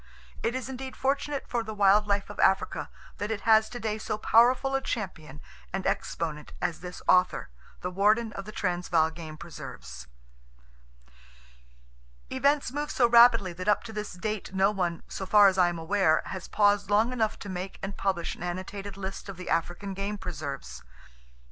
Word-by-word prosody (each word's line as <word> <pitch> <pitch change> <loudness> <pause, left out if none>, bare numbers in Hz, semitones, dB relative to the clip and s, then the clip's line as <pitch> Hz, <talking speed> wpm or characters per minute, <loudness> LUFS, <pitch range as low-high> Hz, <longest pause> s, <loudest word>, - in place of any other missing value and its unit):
It 235 +2 -1
is 260 -1 -3
indeed 265 0 -6
fortunate 275 +1 -1
for 240 - -1
the 220 -1 -6
wild 205 +1 +4
life 200 -1 0
of - - -12
Africa 190 - +2 0.3
that 205 - -2
it 220 -2 -2
has 220 0 +5
today 220 -3 -3
so 215 - -3
powerful 245 +5 +4
a 270 - +1
champion 165 - -5 0.3
and 190 0 -3
exponent 150 -3 -3
as 175 -2 -2
this 180 0 -9
author, 180 0 +3 0.3
the 180 - -3
warden 210 +4 +2
of 195 - -6
the 215 - -8
Transvaal 175 -5 +1
Game 160 -1 -9
Preserves. 65 - -9 2.2
Events 280 +1 +2
move 295 +2 -3
so 240 - +3
rapidly 235 -5 +6
that 185 +3 -7
up 205 - +3
to 225 -1 -9
this 210 -1 -5
date 200 +1 -4
no 195 +2 +4
one, 175 -5 -2
so 190 - -6
far 205 0 +7
as 190 -1 +2
I 175 -1 +5
am 175 - -4
aware, 165 -1 +2
has 190 -2 -6
paused 205 -1 +2
long 220 +4 +3
enough 220 -3 0
to - - -9
make 185 0 -5
and 195 0 -4
publish 185 -4 -1
an - - -15
annotated 190 +3 -5
list 195 +1 -6
of 195 - -7
the 180 - -6
African 175 +4 -1
game 200 +2 -3
preserves. 145 - -6
200 Hz, 175 wpm, -28 LUFS, 180-220 Hz, 2.2 s, far